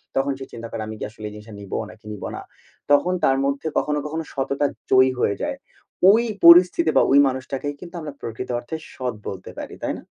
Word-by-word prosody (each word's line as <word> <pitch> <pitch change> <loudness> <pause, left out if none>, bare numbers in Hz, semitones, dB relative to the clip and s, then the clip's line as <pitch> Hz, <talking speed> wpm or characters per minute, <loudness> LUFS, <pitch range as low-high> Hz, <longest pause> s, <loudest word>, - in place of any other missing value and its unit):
তখন 135 +1 +1
সে 135 - -6
চিন্তা 115 0 -7
করে - - -4
আমি 110 - -6
কি - - -5
আসলে 110 0 -10
এই - - -12
জিনিসটা 105 +1 -11
নিব 100 -2 -9 0.2
নাকি 105 -1 -16
নিব 105 - -8
না? - - -6 0.5
তখন 160 +6 +4
তার 135 0 +4
মধ্যে 140 +3 -1
কখনো, 150 0 +1
কখনো, 160 +2 -3
সততা 140 +1 -1 0.3
জয়ী 130 0 +6
হয়ে 100 - +1
যায়। - - -2 0.5
ওই 225 +3 +6 0.2
পরিস্থিতি 170 -1 +8
বা - - +7
ওই 140 - +7
মানুষটাকেই 135 +2 -3
কিন্তু 180 0 -11
আমরা 150 -2 -6
প্রকৃত 115 +1 -6
অর্থে 120 +6 -6 0.2
সৎ 125 -3 -3
বলতে 95 -1 -6
পারি, - - -7
তাই - - -1
না? - - -12
135 Hz, 210 wpm, -23 LUFS, 115-150 Hz, 0.5 s, পরিস্থিতি